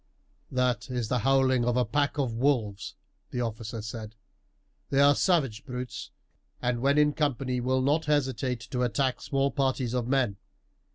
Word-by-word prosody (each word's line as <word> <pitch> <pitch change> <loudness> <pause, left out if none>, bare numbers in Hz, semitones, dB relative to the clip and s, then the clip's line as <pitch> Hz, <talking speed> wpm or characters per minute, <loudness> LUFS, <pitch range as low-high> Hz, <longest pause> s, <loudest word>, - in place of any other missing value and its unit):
"That 125 -2 0
is 120 -3 -2
the 125 - +1
howling 130 0 +3
of 120 +1 +1
a 125 - +3
pack 145 +5 0
of 130 -5 0
wolves," 115 -5 0 0.3
the 125 - -3
officer 115 -1 -4
said. 110 -1 -7 0.7
"They 135 - +1
are 140 0 +7
savage 140 - +1
brutes, 125 -2 -6 0.5
and 120 -1 -1
when 140 +2 +3
in 150 0 +4
company 135 -4 -1
will 130 +1 +1
not 150 +4 +2
hesitate 130 -5 0
to 125 - -1
attack 130 +1 0
small 135 0 0
parties 130 -2 0
of 125 -2 -1
men. 125 -7 +1
125 Hz, 160 wpm, -28 LUFS, 120-140 Hz, 0.7 s, are